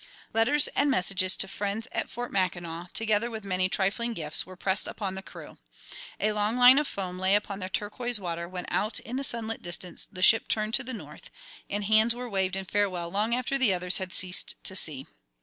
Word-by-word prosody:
Letters 245 +7 +4
and 285 - +1
messages 185 -6 +2
to 195 - 0
friends 205 +3 -3
at - - -2
Fort 245 +1 -6
Mackinac, 175 -2 -2
together 220 +1 +1
with 220 -2 -6
many 185 -1 0
trifling 205 +5 0
gifts, 155 -4 -1
were 185 - -10
pressed 190 +2 0
upon 195 -3 -4
the 190 - -6
crew. - - -12 0.6
A 215 - +1
long 210 +2 0
line 250 +2 +8
of 300 - -1
foam 185 -2 -5
lay 190 +2 +3
upon 205 -1 -2
the 185 -1 -4
turquoise 220 +4 -2
water 170 -2 -4
when 180 -1 -6
out 215 +3 0
in 250 +2 -5
the 275 - -2
sunlit 225 -3 -1
distance 175 +1 -4
the 185 -3 -4
ship 225 - +5
turned 215 0 -1
to 265 - +4
the 255 - -6
north, 210 - -11 0.4
and 205 +1 -2
hands 220 +3 +3
were 250 0 -5
waved 190 -3 0
in 195 0 -3
farewell 185 -4 -1
long 215 +5 +1
after 255 +2 -1
the 220 -8 +4
others 180 +1 +2
had 185 -1 -5
ceased 185 0 +3
to 190 - -2
see. 145 -7 +1
200 Hz, 210 wpm, -27 LUFS, 185-225 Hz, 0.6 s, line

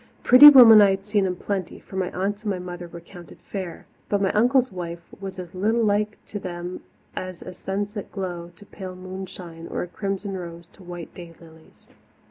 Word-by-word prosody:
Pretty 260 +4 +11
women 235 -6 +9
I 200 - +6
had 195 0 -2
seen 205 -2 +1
in 180 - -2
plenty, 190 -1 -4
for - - -13
my 185 -1 -1
aunts 200 +3 -3
and 215 - -4
my 195 - -1
mother 175 -1 -7
were 170 0 -10
counted 175 0 -14
fair, 185 -4 -7 0.2
but 205 - +1
my 195 -1 +1
uncle's 250 +3 +2
wife 170 -2 -6 0.2
was 195 -1 -7
as 180 -2 -8
little 220 +5 +1
like 210 0 0
to 205 - -6
them 175 -1 -6 0.3
as 185 -2 -6
a 185 - -9
sunset 200 +3 -5
glow 175 -3 -5
to 205 - -16
pale 185 -2 -9
moonshine 185 -2 -9
or - - -3
a - - -7
crimson 195 +1 -4
rose 170 -2 -8
to - - -19
white 175 -2 -9
day 170 -2 -11
lilies. 160 -1 -19
190 Hz, 200 wpm, -24 LUFS, 175-205 Hz, 0.3 s, Pretty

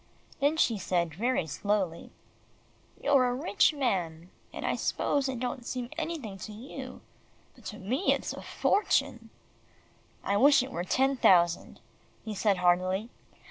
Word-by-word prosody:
Then 290 +3 +2
she 230 -9 +2
said 170 -3 -1
very 235 +1 0
slowly, 190 +1 -2 0.9
"You're 275 -3 +3
a 245 - -1
rich 320 +8 +2
man, 180 - -2 0.2
and - - -6
I - - 0
s'pose 275 -2 0
it 255 -3 -4
don't 250 0 -3
seem 245 0 -5
anything 310 - -5
to 215 - -7
you, 225 +7 -9 0.5
but - - -20
to 210 - -6
me 250 - 0
it's - - -1
a - - -8
fortune." 415 - 0 0.9
"I 200 - +1
wish 275 +2 +6
it 265 - -7
were 175 - -3
ten 270 +8 +1
thousand," 175 -6 +3 0.4
he 220 - -4
said 200 -1 +1
heartily. 185 +5 +1
225 Hz, 145 wpm, -29 LUFS, 185-265 Hz, 0.9 s, wish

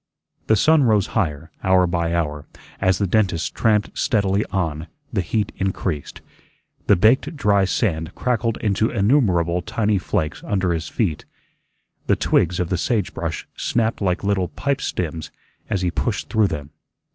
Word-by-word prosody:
The 110 - +5
sun 155 +8 +4
rose 105 -4 +3
higher; 80 -6 -1
hour 95 -1 +4
by 85 -1 -1
hour, 75 -3 -2 0.3
as 95 -1 +2
the 100 - 0
dentist 95 -4 +1
tramped 105 -2 +1
steadily 100 -2 +1
on, 80 -4 -2 0.3
the 100 - +1
heat 105 +4 -1
increased. 95 -6 -3 0.7
The 100 - +6
baked 130 - +3
dry 100 -7 +3
sand 80 -5 -1
crackled 115 -2 0
into 110 +2 +1
innumerable 100 - +2
tiny 105 +2 0
flakes 80 -3 -2
under 95 -3 0
his 80 -1 -3
feet. 90 -10 -2 0.8
The - - +4
twigs 90 +1 +1
of 90 -2 -1
the 90 - 0
sage 110 -4 0
brush 80 -1 -4
snapped 115 -2 -1
like 90 0 0
brittle 100 -2 +1
pipestems 85 - -3 0.4
as 100 -4 -1
he 90 - +1
pushed - - -2
through 110 -2 +3
them. 75 -4 -5
95 Hz, 150 wpm, -22 LUFS, 85-110 Hz, 0.8 s, The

